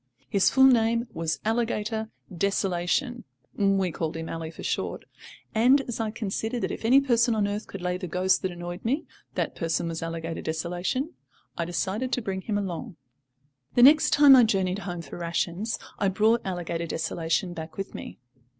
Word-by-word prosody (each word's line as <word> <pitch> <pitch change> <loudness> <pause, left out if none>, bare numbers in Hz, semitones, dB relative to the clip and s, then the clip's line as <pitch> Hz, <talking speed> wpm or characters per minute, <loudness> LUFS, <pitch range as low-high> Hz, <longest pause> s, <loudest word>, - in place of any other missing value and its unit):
His 200 -2 +3
full 265 - +4
name 235 -2 +4
was 165 -1 -2
Alligator 220 -1 -1 0.3
Desolation 195 - 0 0.3
(we 195 -3 +2
called 160 0 -3
him 160 0 -5
"Ally" 165 -1 -4
for 165 - -10
short): - - -2 0.5
and, 250 +5 +5
as 240 -4 -5
I 225 -1 0
considered 220 +2 -3
that - - -1
if - - -6
any 250 +5 +6
person 235 -4 +2
on 210 -2 +1
earth 205 +1 -4
could 195 -2 -8
lay 180 0 0
the 185 - -5
ghost 185 +2 +2
that 190 - -1
annoyed 175 +1 -7
me, 270 +7 0 0.3
that - - -1
person 165 0 -1
was 165 -1 -4
Alligator 165 0 -4
Desolation, 175 - -2 0.4
I 170 - -2
decided 190 +9 -2
to 245 - +1
bring 190 -2 -3
him 205 +1 -2
along. 195 +1 -4 0.8
The 245 - +6
next 300 +4 +7
time 290 -2 +8
I 250 - +7
journeyed 195 -3 +1
home 175 -4 -5
for 150 +3 -9
rations 170 +5 -2 0.2
I 200 - +2
brought 215 +5 +3
Alligator 170 -2 -3
Desolation 165 +2 -1
back 160 -1 -8
with 195 0 -5
me. - - -8
195 Hz, 175 wpm, -26 LUFS, 175-230 Hz, 0.8 s, time